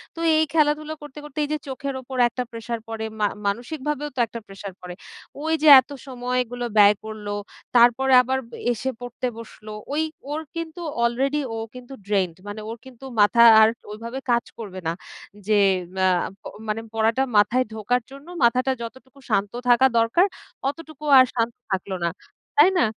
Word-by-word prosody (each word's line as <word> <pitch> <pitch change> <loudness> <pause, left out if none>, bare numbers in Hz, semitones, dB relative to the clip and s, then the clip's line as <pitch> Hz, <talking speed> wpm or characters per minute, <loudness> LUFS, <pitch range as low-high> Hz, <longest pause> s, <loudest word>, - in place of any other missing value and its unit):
তো - - -9 0.2
এই 315 - +4
খেলাধুলা 305 0 +1
করতে, 295 0 -11
করতে 295 -1 -13
এই - - -9
যে - - 0
চোখের 270 0 -4
উপর 260 0 -8
একটা 250 +1 -4
প্রেশার 230 0 -5
পড়ে, 220 0 -4
মা 210 - +3 0.2
মানসিকভাবেও 295 +6 -3
তো - - -4
একটা 230 - -7
প্রেশার 195 -1 -9
পড়ে। 180 0 -7 0.5
ওই 320 0 0
যে 310 - +3
এত 260 - -4 0.2
সময় 250 0 -2
গুলো 245 0 -4
ব্যয় 205 0 +7
করল। 215 -1 -8 0.5
তারপরে 245 +3 +5
আবার 260 +1 -1 0.3
এসে 260 +3 -2
পড়তে 245 +1 -4
বসলো। 215 -1 -11 0.2
ওই 310 - +1 0.3
ওর 310 +2 -2
কিন্তু 330 +1 -5 0.2
অলরেডি 270 +5 +1
ও - - -4 0.2
কিন্তু 250 +1 -10
ড্রেইন্ড। 190 -5 0
মানে 205 +1 -6
ওর 230 - -6
কিন্তু 260 0 -13 0.2
মাথা 235 +3 +6 0.2
আর 220 - +7 0.2
ওইভাবে 230 +5 -6
কাজ 235 0 +2
করবে 195 -5 -7
না। 165 - 0 0.5
যে 215 -1 +4 0.5
আ - - +5 0.3
প - - -74 0.2
মানে 215 +1 -2
পড়াটা 225 +4 +2
মাথায় 240 +5 +4
ঢোকার 240 +3 0
জন্য 275 +4 -12 0.2
মাথাটা 255 +3 +3
যতটুকু 260 +3 -10
শান্ত 205 -1 +1 0.2
থাকা 245 +2 +6
দরকার, 230 +12 +3 0.4
অতটুকু 310 0 -10
আর 255 - +8
শান্ত 230 0 0 0.2
থাকল 190 +1 -2
না। 170 - +2 0.5
তাই 380 - +8
না? - - +4
245 Hz, 170 wpm, -23 LUFS, 220-275 Hz, 0.5 s, আর